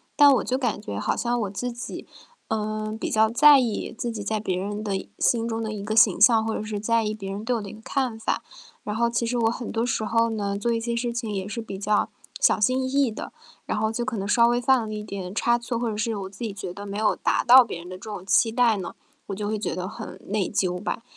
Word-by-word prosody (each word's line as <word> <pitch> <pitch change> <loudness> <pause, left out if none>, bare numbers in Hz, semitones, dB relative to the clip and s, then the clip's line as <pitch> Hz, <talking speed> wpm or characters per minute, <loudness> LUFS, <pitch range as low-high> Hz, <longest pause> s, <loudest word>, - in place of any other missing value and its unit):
但 290 -1 +8
我 - - 0
就 255 - 0
感 240 -6 -1
觉 100 - -5
好 - - 0
像 240 0 0
我 200 - -2
自 245 +5 -4
己， 240 - -7 0.4
呃， 215 0 -2
比 - - -3
较 220 0 +4
在 285 +4 +7
意 235 -3 -2
自 240 - -3
己 210 -2 -5
在 215 +1 -1
别 185 -4 -2
人 205 +3 -3
的 205 -2 -2
一 - - -5
心 230 -1 +2
中 225 -1 -2
的 215 -1 -3
一 200 -1 -5
个 215 +1 -2
形 220 -5 +5
象， 220 +1 +6
或 220 - -1
者 - - -3
是 210 -1 -4
在 230 +1 +1
意 210 0 -1
别 195 -3 -7
人 205 +2 -5
对 250 +2 0
我 - - -4
的 200 - -7
一 - - -9
个 220 - -12
看 255 -5 -1
法。 225 - -1 0.4
然 210 0 -3
后 235 +1 +2
其 235 0 -1
实 245 +1 -1
我 225 -1 +2
很 240 -1 -5
多 230 +1 0
时 225 -2 -1
候 230 0 +2
呢， 200 -2 -2
做 235 +3 0
一 230 - +1
些 235 0 -2
事 240 0 -1
情 235 -2 -4
也 190 -2 -3
是 230 +2 -4
比 195 -3 -7
较 205 +1 +1 0.3
小 - - +4
心 255 +5 +2
翼 - - -1
翼 275 -4 +2
的， - - -7 0.4
然 - - -1
后 220 +1 +1
就 240 +1 -2
可 235 -3 -3
能 195 +1 -3
稍 235 +2 +5
微 240 +1 +2
犯 245 -3 +3
了 - - -6
一 210 - -5
点 195 -2 -6
差 235 +1 +2
错， 235 0 -3
或 235 -2 -1
者 - - -4
是 225 0 -1
我 195 -1 -4
自 200 - -17
己 225 -3 -3
觉 185 -3 -6
得 200 0 -8
没 200 +1 -5
有 215 0 +2
达 - - +1
到 250 +1 +9
别 175 - -6
人 175 - -10
的 185 0 -7
这 - - -21
种 205 -4 -7
期 225 +3 +3
待 230 -3 +3
呢， 185 - -6 0.3
我 195 - -4
就 205 0 -3
会 215 0 -1
觉 - - -2
得 185 0 -3
很 190 -3 -8
内 205 -2 0
疚 185 -3 -1
吧。 230 +2 -3
220 Hz, 310 characters per minute, -25 LUFS, 205-235 Hz, 0.4 s, 到